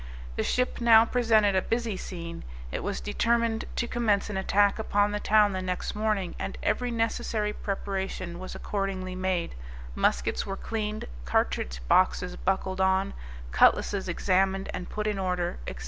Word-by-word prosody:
The - - 0
ship 250 -1 0
now 225 -1 +7
presented 225 -4 +3
a 190 - +3
busy 230 -1 -1
scene; 170 -3 -7 0.3
it - - -3
was - - -3
determined 230 - +1
to 235 - -1
commence 215 -4 +1
an 195 - -3
attack 200 +2 +3
upon 205 -1 +2
the 210 - -2
town 210 -1 +4
the 185 - -2
next 180 -1 -3
morning, 210 -4 -1
and - - -4
every 250 0 0
necessary 225 -2 -1
preparation 190 -3 -4
was 185 - -7
accordingly 195 -2 -3
made, 185 -2 -1 0.4
muskets 65 +1 +1
were 195 0 -5
cleaned, 215 -1 -3 0.2
cartridge - - 0
boxes - - +3
buckled 185 - -1
on, 190 +1 +2 0.4
cutlasses 190 - +3
examined 190 +2 +1
and 180 - -5
put 210 0 -3
in 210 -2 -1
order, 180 - -1
&c. - - -4
195 Hz, 155 wpm, -28 LUFS, 185-215 Hz, 0.4 s, now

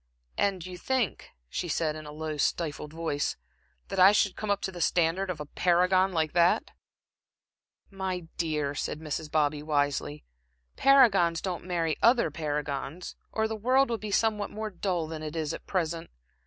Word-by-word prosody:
"And 190 -4 0
you 180 -1 -8
think," 255 0 -1 0.2
she 175 - -3
said, 155 -1 0
in 155 -1 -8
a - - -7
low, 155 0 -4
stifled 150 0 -1
voice, 160 -3 -2 0.5
"that 195 - -2
I 190 +2 +9
should 200 -2 +2
come 215 - -5
up 200 -1 +2
to 190 - -3
the 175 -2 -7
standard 175 +3 +1
of 175 -4 -3
a 150 - -5
paragon 180 +4 +3
like 160 -3 0
that?" 175 0 +3 1.2
"My 190 -2 -3
dear," 150 -4 -1
said 150 - -3
Mrs. 155 0 -4
Bobby, 150 -1 +1
wisely, 145 0 -1 0.5
"paragons 200 -12 +5
don't 180 -3 -4
marry 170 -3 -1
other 235 -8 +4
paragons, 150 +1 -4 0.2
or 220 0 0
the 220 - -3
world 255 +4 +3
would 230 - -2
be 215 - -4
somewhat 210 0 +1
more 215 0 -5
dull 180 -3 -1
than 155 0 -6
it 155 +1 -6
is 160 -1 -2
at - - -9
present. 170 -3 -2
170 Hz, 170 wpm, -28 LUFS, 155-195 Hz, 1.2 s, I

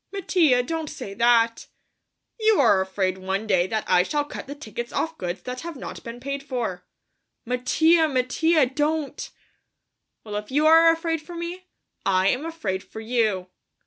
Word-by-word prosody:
"Mattia, 340 -10 +2
don't 320 +3 -3
say 195 - -7
that!" 230 0 +3 0.7
"You 440 -1 +4
are 225 -8 +5
afraid 190 0 -1
one 190 +3 -2
day 185 -4 +2
that 215 +1 -2
I 180 - +5
shall 290 +10 -1
cut 290 - -8
the 285 - -6
tickets 240 -3 -7
off 325 0 -2
goods 180 - -5
that 250 0 -5
have 335 -1 -6
not 260 - -8
been 235 +1 -8
paid 275 +2 -4
for." 240 -10 -4 0.6
"Mattia, 315 +7 +3
Mattia, 295 +3 +2
don't!" 295 +3 -2 0.9
"Well, 210 -1 -5
if 210 0 -6
you 295 +3 +2
are 325 +1 +7
afraid 330 -1 -2
for 345 +3 -10
me, 345 +2 -6 0.4
I 190 0 +3
am 270 +8 -1
afraid 205 - -3
for - - -10
you. 220 -5 -1
255 Hz, 165 wpm, -24 LUFS, 210-320 Hz, 0.9 s, are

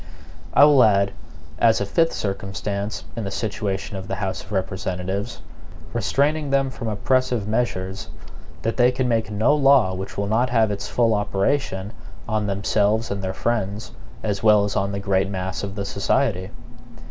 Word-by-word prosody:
I - - +8
will 145 -4 +6
add, 100 -2 +3 0.5
as 115 -1 +4
a 100 - -1
fifth 165 - +2
circumstance 100 +1 -3
in 115 - -3
the 100 - -3
situation 100 -1 -3
of 95 0 -7
the 95 - -2
House 95 -1 -3
of 95 - -16
Representatives, 95 +2 -3 0.5
restraining 150 +1 +1
them 135 -1 +1
from 115 -3 -6
oppressive 125 0 0
measures, 95 -4 -2 0.5
that 115 - -1
they 125 0 +5
can 130 0 -1
make 115 -3 0
no 110 +7 +2
law 135 -9 +4
which 95 +1 -6
will 100 - 0
not 115 +5 +1
have 115 -3 +3
its 100 -1 -4
full 115 -2 +2
operation 105 0 -1 0.3
on 110 -2 -1
themselves 105 +2 +1
and 100 -1 -3
their 95 - -1
friends, 110 -1 -2 0.3
as 100 -3 -1
well 105 -2 +5
as 100 -1 -2
on 100 0 0
the 100 - -3
great 95 -1 +1
mass 95 -1 -3
of 100 0 -5
the 100 -1 -3
society. 100 -1 0
105 Hz, 170 wpm, -23 LUFS, 100-120 Hz, 0.5 s, I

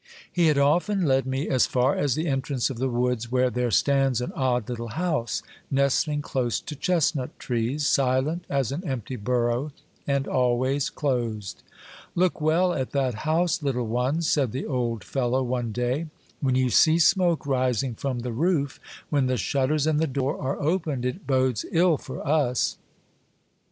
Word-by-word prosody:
He 175 -2 +3
had 150 -2 +3
often 175 +7 +2
led 135 -2 +2
me 135 +3 -2
as 130 -3 +3
far 130 +2 +2
as 145 -4 +1
the 160 - -1
entrance 135 -3 -1
of 120 - -7
the 130 +1 0
woods, 120 -1 -1
where 125 0 +2
there 125 0 0
stands 135 +4 +2
an 125 - -3
odd 125 -4 0
little 120 -1 -4
house, 155 -3 -2 0.3
nestling 140 +2 +1
close 125 -5 -1
to 150 - -8
chestnut 150 -4 0
trees, 125 +5 -1
silent 135 +6 +1
as 135 -4 0
an 155 +7 -4
empty 130 - -4
burrow, 120 +4 0 0.4
and 140 -1 0
always 130 +2 +1
closed. 115 -8 -2 0.5
Look 180 -2 +1
well 170 +4 +3
at 130 -5 -3
that 135 -3 +1 0.2
house, 170 +2 +1
little 130 -4 -1
one," 125 +8 0
said 140 -7 +1
the 130 - -3
old 120 -6 -2
fellow 130 0 0
one 120 -2 -2
day; 125 +7 -1 0.2
'' - - -33
when 130 -3 +1
you 130 -1 +2
see 160 +6 +5
smoke 175 -1 +3
rising 130 -2 0
from 125 +1 -3
the 120 -1 -4
roof, 145 0 0 0.3
when 140 -3 +2
the 130 0 0
shutters 140 +4 0
and 155 -1 +2
the 160 - +1
door 135 +1 -2
are 135 0 -2
opened, 155 -5 -1
it 125 +10 -4
bodes 130 -4 +1
ill 170 -2 +3
for 130 - -8
us." 140 -5 +1
135 Hz, 170 wpm, -25 LUFS, 125-150 Hz, 0.5 s, see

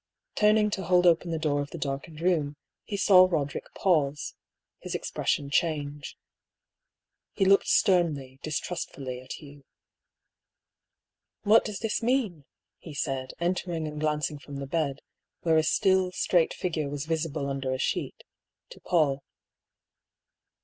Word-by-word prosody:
Turning 210 0 +3
to 195 - -2
hold 180 0 +3
open 170 0 +4
the 165 - -1
door 150 -2 0
of 145 - -5
the 170 - -7
darkened 150 +2 -5
room, 160 -5 +1 0.3
he 200 - -4
saw 185 -2 +7
Roderick 145 -5 -2
pause 150 -6 +1 0.3
— - - -35
^his - - -4
expression 140 -1 -1
change. 145 -3 -1 1.2
He 195 - +1
looked 195 +1 +5
sternly, 150 -8 +2
distrustfully, 140 -5 -4
at 130 - -8
Hugh. 145 -2 -12 1.8
"What 220 +2 +6
does 210 -3 -5
this 225 0 -1
mean?" 225 - 0 0.3
he 155 -4 -10
said, 135 -3 -3
entering 170 -2 -1
and 150 0 -6
glancing 150 -1 -1
from 140 0 -10
the 140 0 -4
bed, 140 -1 -1 0.4
where 160 -2 +3
a - - +5
still, 190 +3 +2
straight 175 -2 +2
figure 160 -5 -2
was 145 0 -4
visible 160 -3 -2
under 135 -1 -2
a 130 - -1
sheet, - - -2 0.5
to - - -11
Paull. 145 -5 +1
155 Hz, 140 wpm, -28 LUFS, 145-180 Hz, 1.8 s, saw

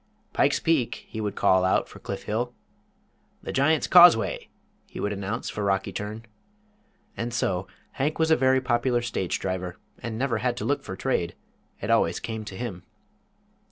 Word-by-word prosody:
"Pike's - - +3
Peak," 155 -8 0
he 110 - -5
would 105 -1 -3
call 95 0 +4
out 95 - +2
for - - -13
Cliff - - -6
Hill. 120 +3 -2 0.9
"The - - -4
Giant's 145 +3 +3
Causeway," 175 -10 +6 0.4
he - - -9
would 105 - -1
announce 100 +4 -4
for 105 - -4
Rocky 95 -1 0
Turn. 105 +2 -5 0.9
And 120 +1 -3
so 95 -5 -1 0.2
Hank 145 +3 -1
was 160 0 +2
a - - +7
very 130 -1 +3
popular 120 -1 +1
stage 100 -6 -1
driver, 90 -1 -3 0.2
and 115 -1 -5
never 130 0 0
had 125 -1 -1
to - - -3
look 145 - +1
for 95 - -7
trade 95 -6 -1 0.5
it - - -1
always - - +3
came 110 -1 -5
to 95 -3 -8
him. 100 -7 -5
115 Hz, 170 wpm, -26 LUFS, 95-130 Hz, 0.9 s, a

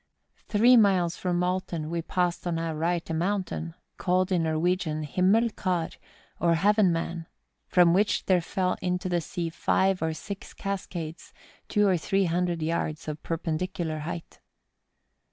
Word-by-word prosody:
Three 235 +4 +6
miles 185 -6 +3
from 180 -1 -1
Alten 180 -3 -2
we 170 0 -1
passed 175 +1 -1
on 170 -1 0
our 165 -1 -2
right 170 +2 -1
a 165 - -3
mountain, 175 -1 -2 0.2
called 185 +1 +1
in 180 -2 +2
Nor¬ 160 -1 0
wegian 165 -3 0
Himellar, 185 -1 +1 0.4
or 170 -1 +3
Heaven 200 +2 +4
man, 165 0 -3 0.4
from 175 -2 +5
which 205 +3 +2
there 185 -2 +3
fell 180 +2 -1
into 180 0 -1
the 175 -1 +1
sea 170 +1 -4
five 190 +2 +1
or 160 -1 -1
six 200 +4 -8
cascades, 175 -5 -5 0.3
two 210 -1 +3
or 185 -2 +3
three 195 +4 +1
hundred 175 -1 0
yards 155 -1 -2
of 150 0 -5
perpendicular 165 0 -2
height. 165 +2 -6
175 Hz, 150 wpm, -27 LUFS, 165-185 Hz, 0.4 s, Three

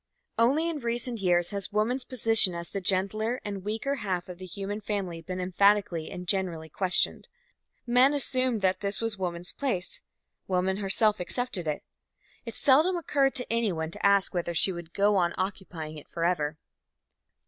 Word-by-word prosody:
Only 280 +8 +3
in 325 -3 -2
recent 235 -1 -1
years 175 -2 +2
has 200 0 -2
woman's 235 +5 0
position 225 -7 +3
as 170 0 -5
the 195 - -4
gentler 210 +6 0
and 200 -2 -5
weaker 220 +7 -2
half 185 -4 -2
of 180 0 -8
the 185 - -8
human 200 +3 -5
family 195 -5 -3
been 185 +2 -5
emphatically 185 -2 +2
and 180 0 -7
generally 170 -4 -1
questioned. 185 +3 +1 0.6
Men 250 +3 +5
assumed 255 -5 +1
that 185 0 +2
this 200 0 0
was 225 -3 -2
woman's 175 -1 -3
place; 230 -11 -3 0.5
woman 190 +1 +1
herself 210 +2 +2
accepted 185 -2 -3
it. 150 - -2 0.6
It - - -6
seldom 315 +7 +4
occurred 280 -5 +1
to 250 -2 0
anyone 180 -9 0
to - - -7
ask 200 -1 +4
whether 175 -1 -2
she 190 - +4
would 170 -2 -8
go 200 +2 +3
on 175 -2 +1
occupying 175 -5 -4
it - - -18
forever. 165 -3 -1
195 Hz, 165 wpm, -28 LUFS, 180-230 Hz, 0.6 s, Men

